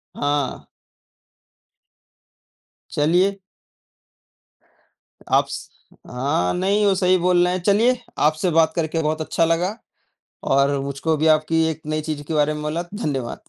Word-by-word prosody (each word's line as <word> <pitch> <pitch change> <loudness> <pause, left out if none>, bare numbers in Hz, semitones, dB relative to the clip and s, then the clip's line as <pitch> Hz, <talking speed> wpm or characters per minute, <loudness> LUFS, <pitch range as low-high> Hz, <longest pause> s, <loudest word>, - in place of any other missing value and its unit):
हाँ। 145 -2 -2 2.2
चलिए 180 +6 +1 1.9
आप - - +4
स - - -7 0.4
हाँ 125 -8 -1
नहीं, 200 +3 +1
वो 200 - +4
सही 185 -1 +3
बोल 175 0 +3
रहे 180 0 +1
हैं। 185 - -2
चलिए, 230 +6 +3 0.2
आपसे 155 +4 +2
बात 160 0 +3
करके 165 -1 -1
बहुत 155 +1 -1
अच्छा 165 +1 0
लगा 175 +5 0 0.8
और 140 +1 +2
मुझको 140 +3 -1
भी 160 +2 +1
आपकी 160 +1 0
एक 160 0 -5
नई 155 0 -1
चीज़ 150 -1 -5
के 160 - -3
बारे 150 0 +2
में 150 - -6
मोला, 155 +3 -2
धन्यवाद। 140 - -4
160 Hz, 135 wpm, -21 LUFS, 150-180 Hz, 2.2 s, आप